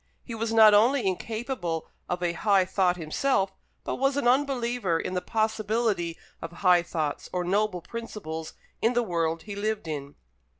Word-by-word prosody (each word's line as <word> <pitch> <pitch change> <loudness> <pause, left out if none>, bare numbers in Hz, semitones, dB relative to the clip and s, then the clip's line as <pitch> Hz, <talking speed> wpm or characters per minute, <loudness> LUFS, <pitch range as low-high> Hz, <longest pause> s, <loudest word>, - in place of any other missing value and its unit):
He 240 - -7
was 225 0 -2
not 220 -2 +7
only 240 +5 +4
incapable 195 - -3 0.2
of 180 0 -2
a 170 -1 +1
high 195 0 +3
thought 180 -1 +1
himself, 190 - 0 0.3
but - - -3
was 270 +1 +1
an 285 - +1
unbeliever 245 - +1
in 185 - -3
the 180 - -1
possibility 215 -5 0 0.2
of 165 - -6
high 180 0 +4
thoughts 160 -4 -3
or 180 -1 -1
noble 190 -1 0
principles 195 -9 -6 0.3
in 230 +2 +3
the 240 0 +2
world 165 -4 -1
he 205 -2 -7
lived 215 -2 -2
in. 145 -2 -5
200 Hz, 165 wpm, -27 LUFS, 175-230 Hz, 0.3 s, not